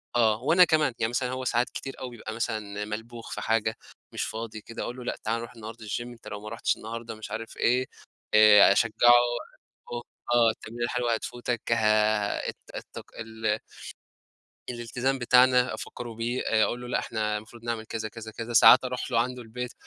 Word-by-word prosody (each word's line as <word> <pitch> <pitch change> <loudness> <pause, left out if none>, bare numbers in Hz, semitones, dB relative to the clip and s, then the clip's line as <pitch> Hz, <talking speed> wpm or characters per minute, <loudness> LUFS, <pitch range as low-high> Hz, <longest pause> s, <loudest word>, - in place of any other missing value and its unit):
آه، 110 -1 +3
وأنا 175 +6 +6
كمان، 155 -6 +2
يعني 110 - +1
مثلًا 125 +1 -1
هو 130 +1 -4
ساعات 120 0 +1
كتير 135 - -7
أوي 130 - -5
بيبقى 110 -2 -8
مثلًا 105 -2 -3
ملبوخ 115 +2 -7
في - - -4
حاجة 110 0 +1 0.4
مش - - -2
فاضي 110 -1 -5
كده، 115 +2 -7
أقول 120 - -5
له: 125 - -7
"لأ - - -2
تعالَ 115 +2 0
نروح 115 +1 -8
النهارده 110 +1 -9
الجيم، 120 +3 -4
أنت 120 -1 -14
لو 105 - -6
ما 105 - -7
رُحتش 115 +1 0
النهارده" 115 +1 -7
مش 110 - -9
عارف 115 0 -6
إيه 125 +2 +2 0.5
آآ، 105 -2 +8
أشجعه 115 +3 +2 1.4
آه 120 -1 +5
التمرينة 120 +2 -7
الحلوة 120 -1 0
هتفوتك 120 +1 -3
آآ 110 -2 +2
الت - - -8 0.2
التك - - -8
ال 110 -1 -2 1.1
الالتزام 125 +3 -2
بتاعنا 125 0 +4
أفكره 120 -2 -7
بيه 120 +3 -2
آآ، 110 -1 +3
أقول 120 - -2
له 125 - -8
لأ - - 0
إحنا 105 -2 -2
المفروض 115 +2 -10
نعمل 115 -2 -3
كذا 110 0 -4
كذا 110 0 -9
كذا، 115 +2 -6
ساعات 125 +3 +8
أروح 125 0 -4
له 115 - +2
عنده 125 +1 -2
البيت 120 +2 -6
115 Hz, 185 wpm, -27 LUFS, 110-120 Hz, 1.4 s, آآ